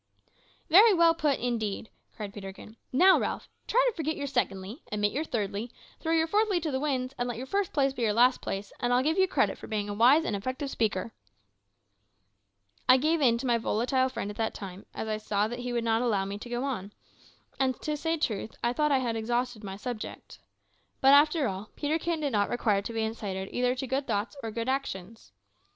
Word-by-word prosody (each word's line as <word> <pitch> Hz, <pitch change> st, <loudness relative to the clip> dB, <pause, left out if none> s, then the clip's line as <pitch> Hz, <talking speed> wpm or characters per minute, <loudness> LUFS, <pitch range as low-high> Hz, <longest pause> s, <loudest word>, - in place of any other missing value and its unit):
"Very 400 Hz, +5 st, +7 dB
well 335 Hz, -1 st, +5 dB
put, 300 Hz, -4 st, +1 dB
indeed," 220 Hz, -4 st, -2 dB, 0.2 s
cried 205 Hz, -3 st, -6 dB
Peterkin. 200 Hz, +2 st, -9 dB, 0.2 s
"Now, 370 Hz, +8 st, +6 dB
Ralph, -, -, -3 dB, 0.2 s
try -, -, +3 dB
to 485 Hz, -, 0 dB
forget 315 Hz, -1 st, -2 dB
your 285 Hz, -, -4 dB
`secondly,' 220 Hz, -4 st, -2 dB
omit 205 Hz, 0 st, +1 dB
your 295 Hz, -, -1 dB
`thirdly,' 215 Hz, -4 st, -3 dB, 0.3 s
throw 325 Hz, -, -2 dB
your 325 Hz, 0 st, +3 dB
`fourthly' 410 Hz, 0 st, +2 dB
to 310 Hz, -, -1 dB
the 260 Hz, -, -1 dB
winds, 265 Hz, -3 st, -1 dB
and 245 Hz, 0 st, -1 dB
let 235 Hz, -, -4 dB
your 255 Hz, -, -5 dB
`first 395 Hz, +6 st, -1 dB
place' 275 Hz, -2 st, +2 dB
be 250 Hz, -, -6 dB
your 225 Hz, -2 st, +2 dB
`last 250 Hz, +2 st, +4 dB
place,' 195 Hz, +1 st, -5 dB
and 245 Hz, -1 st, 0 dB
I'll 250 Hz, +1 st, +3 dB
give 320 Hz, +6 st, +1 dB
you 380 Hz, -, +5 dB
credit -, -, +1 dB
for -, -, -9 dB
being 210 Hz, -1 st, -2 dB
a -, -, -2 dB
wise 255 Hz, +10 st, +5 dB
and -, -, -1 dB
effective 260 Hz, +7 st, -4 dB
speaker." 220 Hz, -1 st, -1 dB, 1.8 s
I 255 Hz, -, +9 dB
gave 310 Hz, +4 st, +1 dB
in 235 Hz, -4 st, +4 dB
to 255 Hz, -, -5 dB
my 240 Hz, -2 st, +2 dB
volatile 255 Hz, +4 st, +1 dB
friend 220 Hz, -5 st, -4 dB
at 205 Hz, -, -11 dB
that 225 Hz, -1 st, -1 dB
time, 195 Hz, -1 st, -8 dB
as -, -, -4 dB
I 215 Hz, 0 st, -1 dB
saw 210 Hz, -1 st, 0 dB
that 240 Hz, +2 st, -6 dB
he 245 Hz, 0 st, -4 dB
would 235 Hz, -1 st, -1 dB
not 225 Hz, 0 st, +2 dB
allow 210 Hz, -6 st, +1 dB
me 200 Hz, +1 st, -5 dB
to 240 Hz, -, -9 dB
go 240 Hz, +1 st, -2 dB
on, 210 Hz, -7 st, -4 dB, 0.7 s
and, 260 Hz, -1 st, +1 dB
to 300 Hz, -, -1 dB
say 325 Hz, +2 st, -1 dB
truth, 220 Hz, -7 st, -2 dB
I 240 Hz, -, +2 dB
thought 300 Hz, +4 st, +1 dB
that 280 Hz, -, +4 dB
I 260 Hz, -1 st, +1 dB
had 230 Hz, -1 st, -1 dB
exhausted 240 Hz, 0 st, -2 dB
my 195 Hz, -1 st, -6 dB
subject. 225 Hz, +1 st, -7 dB, 0.6 s
But, 270 Hz, +1 st, +6 dB
after 300 Hz, 0 st, +5 dB
all, 195 Hz, +1 st, -5 dB
Peterkin 320 Hz, +2 st, -1 dB
did 285 Hz, -2 st, 0 dB
not 205 Hz, -2 st, +1 dB
require 215 Hz, -4 st, +1 dB
to 205 Hz, -, -6 dB
be 225 Hz, -1 st, -1 dB
incited 200 Hz, -4 st, -4 dB
either 250 Hz, 0 st, +1 dB
to 260 Hz, -, -4 dB
good 270 Hz, +2 st, -2 dB
thoughts 210 Hz, +3 st, -1 dB
or 225 Hz, -, -4 dB
good 230 Hz, +2 st, -4 dB
actions. 225 Hz, -, -4 dB
245 Hz, 220 wpm, -28 LUFS, 215-285 Hz, 1.8 s, I